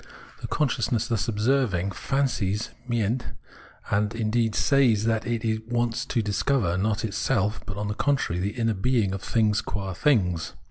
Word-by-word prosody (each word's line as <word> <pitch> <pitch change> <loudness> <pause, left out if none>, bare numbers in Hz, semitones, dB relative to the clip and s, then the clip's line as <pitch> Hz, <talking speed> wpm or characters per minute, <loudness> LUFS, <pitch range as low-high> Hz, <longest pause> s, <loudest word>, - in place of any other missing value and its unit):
The - - -4
consciousness 120 -6 0
thus 115 -4 -1
observing 105 -4 +1
fancies 110 -4 -1 0.2
{meint), 120 +1 0 0.7
and, 105 +2 +1
indeed, 115 -1 0
says 125 -7 +3
that 115 0 0
it 110 -1 -1
wants 120 -1 0
to 115 -4 0
discover 105 -2 +1
not 105 +3 0
itself, 110 0 0
but, 100 - -5
on 105 0 -2
the 105 - -1
contrary, 125 -9 0
the 100 +5 -3
inner 115 -1 +1
being 105 -1 +1
of 100 - -4
things 105 -2 +2
qua 95 -2 -4
things. 90 - +1
110 Hz, 150 wpm, -26 LUFS, 100-120 Hz, 0.7 s, says